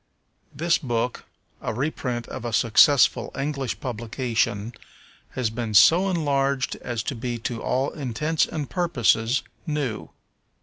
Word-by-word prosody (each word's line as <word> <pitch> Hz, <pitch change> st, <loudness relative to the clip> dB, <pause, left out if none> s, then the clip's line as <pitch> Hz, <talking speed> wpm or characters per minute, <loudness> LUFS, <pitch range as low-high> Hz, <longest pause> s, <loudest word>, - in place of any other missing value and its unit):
This 170 Hz, +2 st, +1 dB
book, 120 Hz, -3 st, -2 dB, 0.4 s
a 115 Hz, -, -3 dB
reprint 125 Hz, -3 st, -2 dB
of -, -, -7 dB
a 120 Hz, -2 st, -4 dB
successful 120 Hz, +5 st, +4 dB
English 140 Hz, -2 st, -2 dB
publication, 115 Hz, -2 st, -2 dB, 0.6 s
has 125 Hz, -4 st, -1 dB
been 115 Hz, -2 st, -4 dB
so 165 Hz, -, +6 dB
enlarged 140 Hz, -5 st, 0 dB
as 120 Hz, -2 st, -4 dB
to -, -, -3 dB
be 120 Hz, 0 st, -4 dB
to 115 Hz, 0 st, -4 dB
all 135 Hz, +2 st, 0 dB
intents 150 Hz, +3 st, -1 dB
and 150 Hz, -3 st, -4 dB
purposes 130 Hz, -, +1 dB, 0.2 s
new. 145 Hz, -8 st, -3 dB
125 Hz, 125 wpm, -24 LUFS, 115-145 Hz, 0.6 s, so